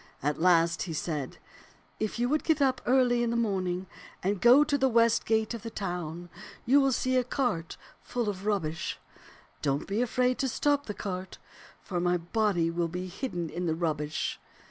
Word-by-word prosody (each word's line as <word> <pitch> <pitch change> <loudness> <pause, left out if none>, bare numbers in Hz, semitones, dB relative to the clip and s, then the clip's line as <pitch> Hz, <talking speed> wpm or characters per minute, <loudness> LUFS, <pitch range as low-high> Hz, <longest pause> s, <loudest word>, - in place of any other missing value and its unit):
At 150 +2 -1
last 170 -1 +4
he 170 - -3
said, 150 -4 -3 0.3
* - - -31
If 215 +1 -2
you 240 +1 +1
will 300 +4 +2
get 320 0 +1
up 260 -2 +2
early 245 -1 +4
in 240 - +1
the 235 - -1
morning 190 -5 -1 0.4
and 195 0 0
go 250 +6 +7
to 295 -1 0
the 265 -1 +3
west 230 -1 +3
gate 220 +1 +1
of 230 - -6
the 230 - -6
town, 175 -4 -4 0.4
you 275 +4 +5
will 270 0 +3
see 255 +1 +1
a 255 - +3
cart 240 - -2 0.2
full 240 -3 -3
of 200 0 -4
rubbish. 165 -7 -1 0.6
Don't 140 -1 0
be 205 +4 0
afraid 250 +1 +1
to 270 - +1
stop 285 +3 +1
the 210 - -4
cart, 185 -1 -5 0.5
for 180 -3 -3
my 175 0 +2
body 175 -1 0
will 170 0 0
be 180 +2 -5
hidden 175 - -4
in 175 +1 -3
the 160 - +1
rubbish.' 155 -2 -2
200 Hz, 190 wpm, -29 LUFS, 175-245 Hz, 0.6 s, go